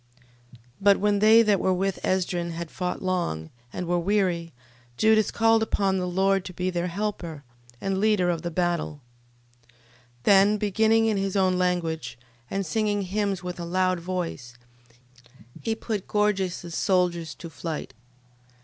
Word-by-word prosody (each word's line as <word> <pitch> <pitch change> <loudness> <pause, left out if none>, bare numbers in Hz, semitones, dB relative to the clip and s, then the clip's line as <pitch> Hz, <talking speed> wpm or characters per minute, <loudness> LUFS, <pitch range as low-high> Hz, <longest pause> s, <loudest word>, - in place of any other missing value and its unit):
12:36. 125 - -17 0.2
But 200 0 +5
when 205 0 +1
they 220 +2 +7
that 210 -3 +3
were 185 - +2
with 195 +1 -1
Esdrin 175 -2 -1
had 170 -1 -6
fought 180 -1 -3
long, 170 - -2 0.2
and 180 - -4
were 175 +1 +1
weary, 175 -3 0 0.5
Judas 220 -1 +4
called 225 0 +3
upon 195 -3 +1
the 180 - -2
Lord 190 +1 +1
to 185 - -7
be 185 +1 -1
their 175 0 -1
helper, 175 -5 -4 0.4
and 195 -1 -1
leader 210 -3 +2
of 170 - -3
the 175 - -3
battle: 170 -3 -1 0.6
12:37. - - -37 0.5
Then 200 +4 +5
beginning 220 +2 +2
in 220 -2 +1
his 195 0 -2
own 185 -2 +3
language, 165 -9 -1 0.3
and 195 0 -2
singing 205 +1 0
hymns 195 0 -2
with 180 0 -5
a - - -4
loud 185 +1 +1
voice, 170 -9 -5 1.1
he 225 -1 -1
put 215 -3 -4
Gorgias's 190 -5 0
soldiers 175 -4 0
to 170 - -9
flight. 160 -1 -6
185 Hz, 155 wpm, -25 LUFS, 175-205 Hz, 1.1 s, they